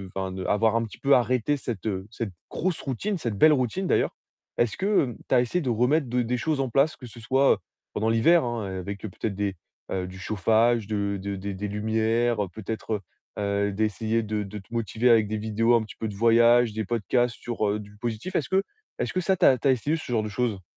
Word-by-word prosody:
enfin, 95 -1 -2
d'avoir 105 +4 +1
un 115 - +2
petit 110 - -12
peu 140 0 +4
arrêté 125 +4 +1
cette, 115 -6 -5
heu, 95 -1 -3
cette 115 -3 -4 0.2
grosse 180 -1 -1
routine, 185 - -2
cette 115 -10 -3
belle 155 +7 +7
routine 140 - -1
d'ailleurs, - - +1 0.4
est-ce 120 -2 +1
que 190 - +1
tu - - -1
as 125 - +6
essayé 150 +9 -1
de 135 - -2
remettre 125 +6 +2
de 125 +1 0
des 125 +1 -1
choses 150 +4 -1
en 135 - -1
place, 140 +6 +2
que 125 - -11
ce 120 +1 -12
soit 130 +5 +3 0.3
pendant 110 +2 0
l'hiver, 125 +8 +4
heu, 105 -6 -3
avec 100 +2 -6
peut-être 110 0 -4
des 100 -1 -2 0.4
du 95 0 -3
chauffage, 110 +3 +2
de 100 -2 -1
de 100 +1 -4
des 100 +1 -4
lumières, 110 +3 0 0.2
peut-être 110 0 -4 0.4
d'essayer 105 +3 0
de 105 0 -2
de 100 +1 -8
te 100 +4 -16
motiver 115 +1 +1
avec 110 -3 +5
des 110 +1 -2
vidéos, 110 +2 +2
un 115 - +2
petit 110 - -11
peu 110 - -3
de 105 - -6
voyage, 115 +1 +5
des 110 0 -3
podcasts 120 +3 0
sur, 115 -3 -2
heu, 105 - -1
du 105 0 -12
positif. 120 - -4
Est-ce 140 - 0
que 190 +1 +2 0.4
est-ce - - -2
que 185 - 0
ça, 190 +2 +2
tu - - +3
as 130 - +6
tu 140 - 0
as - - +6
essayé 135 +5 0
ce 160 - -7
genre 110 -3 +1
de 105 - -4
choses? 105 -3 -2
115 Hz, 220 wpm, -26 LUFS, 105-125 Hz, 0.4 s, belle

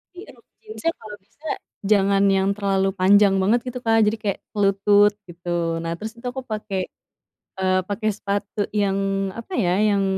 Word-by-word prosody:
Jadi 365 - -9
rok - - -24 0.2
jeansnya 430 -6 -2
kalau 215 -2 -9
bisa, 245 +11 -14 0.4
jangan 200 -1 +3
yang 190 0 +2
terlalu 195 -1 +1
panjang 195 +1 +5
banget 215 +6 +3
gitu 250 0 -4
Kak, 225 0 +3
jadi 220 +1 +1
kayak 200 -2 -1
se 215 - -12
lutut 205 +1 +4
gitu. 170 -1 -3
Nah 165 - -3
terus 220 +4 -6
itu 235 - -14
aku 265 0 -6
pakai, 215 -4 -4 0.8
eee, 185 0 +2
pakai 215 +2 -1
sepatu 200 +1 -4
yang, 200 -2 +1 0.4
apa 230 +11 -9
ya, 180 -6 +2
yang, 205 -2 +2
200 Hz, 170 wpm, -22 LUFS, 195-215 Hz, 0.8 s, panjang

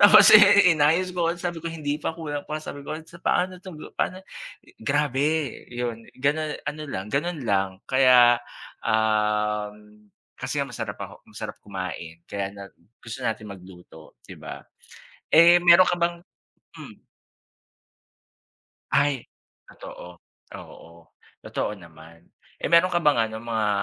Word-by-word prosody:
Tapos, 205 +1 +9
eh, 205 -3 +8
inayos 165 +4 +2
ko, 170 -2 0
ang 170 - -1
sabi 175 -1 -4
ko, 165 - -5
"Hindi 150 -2 -4
pa, 160 - -4
kulang 145 -3 -6
pa," 155 - -3
sabi 155 -2 -8
ko 150 +2 -6
at, 160 - -11
"so 170 +1 -16
paano 185 0 0
to 185 -3 -10
ga 150 - -11
paano." 185 - -2 0.5
I - - -21
grabe, 145 -2 0 0.5
iyon, 120 -2 -5
gano 145 +4 0 0.2
ano 155 +1 -5
lang, 100 -4 -6
gano'n 155 +2 -1
lang. 95 -3 +1
Kaya, 125 -2 +5 0.4
um, 105 -1 -1 0.3
kasi - - -4
nga, - - +1
masarap - - -5
ako - - -9
ang - - -17
sarap - - -6
kumain, 90 -4 -7
kaya 100 -1 -4
nag 100 -1 -11 0.2
gusto 115 +3 -9
natin 115 -3 -3
magluto 90 -4 -15
'di - - -12
ba? - - -9 0.7
Eh, 170 +2 +8
meron 175 +1 +6
ka 175 - 0
bang 170 0 -1 0.5
hmm. - - -13 1.8
Ay, 140 -4 +1 0.4
totoo. 90 0 -11 0.4
Oo, 85 0 -14 0.3
totoo - - -3
naman. 85 -2 -16 0.3
Eh, - - -4
meron 170 +2 +6
ka 175 -1 -1
bang 120 -7 +3
ano 110 - -8
mga, 110 -2 -1
135 Hz, 150 wpm, -24 LUFS, 105-170 Hz, 1.8 s, Tapos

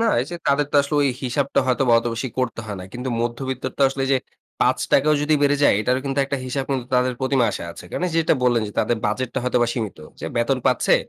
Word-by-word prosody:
না, 230 - +2
এই 130 - -3
যে 175 - -4
তাদের 140 +1 +2
তো - - +3
আসলে 140 +2 -4
ওই 140 - +3
হিসাবটা 135 +2 0
হয়তোবা 125 -1 +2
অতো 115 - -2
বেশি 125 +3 -3
করতে 125 -2 -1
হয় 105 - -5
না। 90 - -7
কিন্তু 125 +1 -5
মধ্যবিত্তের 130 +2 -3
তো 140 - +3
আসলে 135 0 -3
এই - - -1
যে 135 - +4 0.4
৳৫ 140 - +2
ও - - +4
যদি 155 +1 +2
বেড়ে 145 0 +4
যায় - - +6
এটারও 125 +4 +1
কিন্তু 135 +1 -2
একটা 140 +1 -2
হিসাব 130 +1 -2
কিন্তু 130 -3 -1
তাদের 125 0 +2
প্রতিমাসে 130 -8 +1
আছে। 85 - -11
কারণ 180 - -2
যেটা 160 -1 +3
বললেন, 120 -2 +3
যে - - -10
তাদের 120 +2 +1
বাজেটটা 125 +5 -2
হয়তোবা 125 -1 +2
সীমিত। 110 -7 -4 0.2
যে - - -4
বেতন 120 +3 +1
পাচ্ছে 125 -2 +3
130 Hz, 240 wpm, -22 LUFS, 120-140 Hz, 0.4 s, যায়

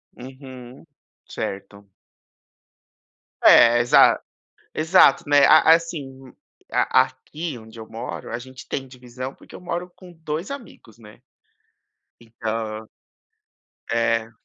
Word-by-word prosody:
Uhum. 130 0 -12 0.4
Certo. 100 0 -7 1.5
É, 120 0 +7
exa 120 0 +5 0.5
exato, 160 -4 +4
né, 145 -1 +5
a 155 +2 +6
assim, 140 -6 -4 0.4
a - - +3
aqui 135 +3 -8
onde 110 0 -14
eu 110 - -9
moro, 115 +1 -8
a 120 - -4
gente 130 +1 -12
tem 135 -1 -5
divisão, 130 +1 -9
porque - - -19
eu - - -10
moro 180 0 -5
com 180 -2 -15
2 160 +2 -6
amigos, 235 - -11
né. 105 -2 -17 1.0
Entã 110 -1 -5 1.0
É. 115 -1 0
130 Hz, 110 wpm, -22 LUFS, 115-155 Hz, 1.5 s, É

